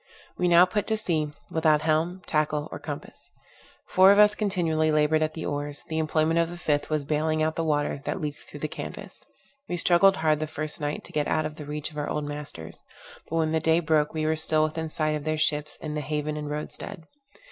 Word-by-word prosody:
We 180 - +1
now 175 +1 +7
put 200 +3 -2
to 220 - +1
sea, 160 -8 -1 0.2
without 155 -2 +3
helm, 165 +4 0
tackle, 150 -1 0
or - - -6
compass. - - -8 0.6
Four 190 +1 +6
of 200 - +5
us 210 0 +7
continually 170 -7 +1
labored 155 +1 +3
at 155 0 -1
the 160 - -5
oars; 145 0 -4
the 160 0 -1
employment 160 +1 +2
of 165 0 +1
the 175 - -7
fifth 145 -3 0
was 155 -2 -1
baling 155 +1 +1
out 155 0 0
the 165 - -1
water 145 -2 0
that - - -2
leaked 150 -3 -4
through - - -12
the - - -1
canvas. - - -8 0.5
We 175 - -1
struggled 180 +3 +5
hard 155 -1 +2
the 155 - -2
first 155 -1 -4
night 145 0 -2
to - - -12
get 150 -1 0
out 155 0 +1
of 155 0 -5
the 150 - -7
reach 150 +2 -4
of 150 - -6
our 145 - -2
old 150 - -2
masters; 145 - -7 0.5
but 165 - -3
when 160 -1 +1
the 160 - +2
day 160 +1 +3
broke, 155 -2 +2
we 155 -1 -2
were 160 0 +2
still 155 0 +2
within 160 +1 -2
sight 155 0 0
of 150 -1 -3
their 155 +1 -1
ships 150 -1 0
in 155 -1 -6
the 150 - -2
haven 150 +1 -2
and 150 -1 -4
road 150 +1 -4
stead. 165 - -8
155 Hz, 235 wpm, -26 LUFS, 150-165 Hz, 0.6 s, now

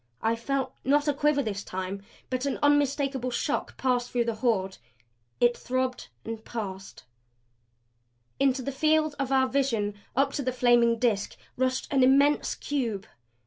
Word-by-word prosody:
I 225 +1 +2
felt, 260 +2 -2
not 290 +3 +2
a 295 - +3
quiver 290 0 +2
this 205 -3 -3
time, 190 +1 -5 0.3
but 255 +2 -1
an 275 - -1
unmistakable 280 -3 +2
shock 265 +4 -2
pass 250 -2 +1
through 240 -1 0
the 230 - -1
Horde. 215 -5 -1 0.6
It 240 0 +4
throbbed 255 0 -2 0.2
and 225 -1 -6
passed. 195 -5 -7 1.4
Into 265 -1 +2
the 275 - -3
field 310 +2 +2
of 275 -1 -2
our 265 -1 +4
vision, 245 -7 0 0.2
up 275 +2 +2
to - - -2
the 255 -1 -1
flaming 240 -2 +4
Disk 220 -4 0 0.2
rushed 255 0 0
an 270 - +4
immense 280 +3 +4
cube. 235 -9 -2
255 Hz, 150 wpm, -27 LUFS, 230-275 Hz, 1.4 s, It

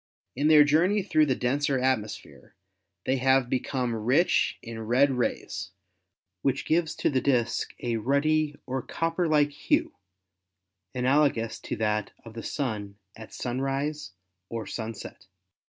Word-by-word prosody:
In 145 +4 +1
their 155 -1 +8
journey 175 +8 +3
through 155 -5 +3
the 130 - +2
denser 135 +3 0
atmosphere 125 -5 -3 0.5
they 130 - +1
have 130 -1 +2
become 125 -1 -1
rich 125 +10 +2
in 115 -1 -7
red 135 +4 +4
rays, 125 -2 -2 0.7
which 135 -1 0
gives 165 0 +1
to - - 0
the 130 -2 +1
disk 120 -3 0
a 120 -2 0
ruddy 145 +5 +1
or 130 0 -2
copper 165 +6 -1
like 150 -2 +3
hue 145 - 0 1.0
analogous 125 -3 +2
to - - -5
that 105 -1 -1
of 115 - -10
the 115 - -6
Sun 105 -9 -4 0.2
at 110 0 -11
sunrise 135 0 -3 0.4
or 115 -2 -4
sunset. 110 -1 -7
130 Hz, 135 wpm, -27 LUFS, 115-150 Hz, 1.0 s, their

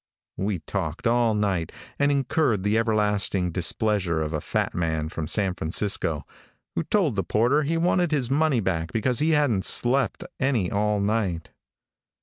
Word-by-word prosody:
We 100 0 -1
talked 85 +2 -4
all 115 -1 +3
night, 95 -6 -1 0.3
and 145 0 +3
incurred 135 - +1
the 105 +1 +1
everlasting 105 -5 +1
displeasure 90 0 0
of 75 +1 -4
a 75 - -2
fat - - -1
man 80 -2 -1
from 80 -2 -5
San 95 +1 +1
Francisco, 80 -3 -1 0.5
who - - -1
told 175 - +1
the 95 - 0
porter 120 - +2
he 160 +3 -1
wanted 175 +1 +2
his 135 -5 0
money 145 -4 +2
back 85 -4 -2
because 120 +3 0
he 155 +2 +2
hadn't 120 -10 +1
slept 120 0 +2 0.2
any 125 -9 +1
all 105 0 +1
night. 100 -5 -1
105 Hz, 155 wpm, -25 LUFS, 90-130 Hz, 0.5 s, all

